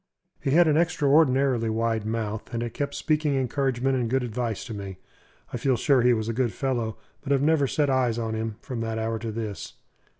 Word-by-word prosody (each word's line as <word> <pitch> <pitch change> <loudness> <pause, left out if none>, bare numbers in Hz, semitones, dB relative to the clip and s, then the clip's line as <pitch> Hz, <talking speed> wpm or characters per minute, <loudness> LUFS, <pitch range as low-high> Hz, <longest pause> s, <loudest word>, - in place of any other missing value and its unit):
He - - -1
had 165 +4 +5
an 155 -1 +3
extraordinarily 140 -7 +3
wide 110 -1 -1
mouth, 110 -1 -3
and 115 - -1
it 120 -1 -5
kept 140 -1 -3
speaking 150 -2 +1
encouragement 135 0 0
and 120 -3 -1
good 130 +1 +1
advice 115 -2 -3
to 115 - -6
me. 100 -2 -7 0.6
I - - -1
feel 130 +1 +1
sure 135 0 +3
he 125 +1 +4
was 110 -1 -3
a 115 - -1
good 120 -1 0
fellow, 120 -5 -2 0.2
but 140 - -5
have 140 0 +3
never 150 -2 +3
set 145 +2 +1
eyes 130 -4 +1
on 115 -1 -2
him 110 0 -3
from 125 -3 -5
that 115 0 -2
hour 110 0 -2
to 115 0 -4
this. 110 -2 -5
120 Hz, 210 wpm, -26 LUFS, 115-135 Hz, 0.6 s, had